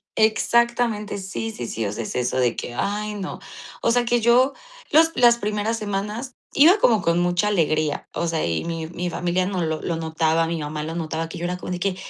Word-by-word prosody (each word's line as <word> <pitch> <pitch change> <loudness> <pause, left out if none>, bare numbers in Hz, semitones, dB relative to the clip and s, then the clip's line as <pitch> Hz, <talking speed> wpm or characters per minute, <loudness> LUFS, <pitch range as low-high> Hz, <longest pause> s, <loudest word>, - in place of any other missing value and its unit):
Exactamente, 225 -1 +2
sí, 195 +4 -4
sí, 120 - -6
sí, 115 -1 -3
o 100 - -2
sea, 110 +2 -4
es - - -6
eso 125 +1 -1
de 125 -2 +2
que: 120 - -5
"Ay 210 +7 -2
no". 190 -2 -5 0.4
O 230 - +2
sea, 240 0 +2
que 240 0 +2
yo 250 +4 +4 0.4
los 320 +2 +5
las 240 -1 +5
primeras 210 +1 -1
semanas 210 +5 -4 0.2
iba 335 +8 +7
como 225 - +4
con 170 +1 +2
mucha 175 +4 +1
alegría, 155 -5 0
o 170 - -1
sea, 165 -1 -1
y 85 -1 -1
mi 165 -1 -4
mi 175 +1 -4
familia 180 +2 0
no 185 -1 -2
lo 160 -1 -2
lo 170 - -2
notaba, 160 0 +1
mi 165 0 -2
mamá 150 0 -4
lo 160 +2 -5
notaba, 165 -1 -3
que - - -7
yo 175 - -4
era 180 +1 -2
como 180 - -7
de 180 - -3
que: 195 0 0
180 Hz, 225 wpm, -23 LUFS, 160-220 Hz, 0.4 s, iba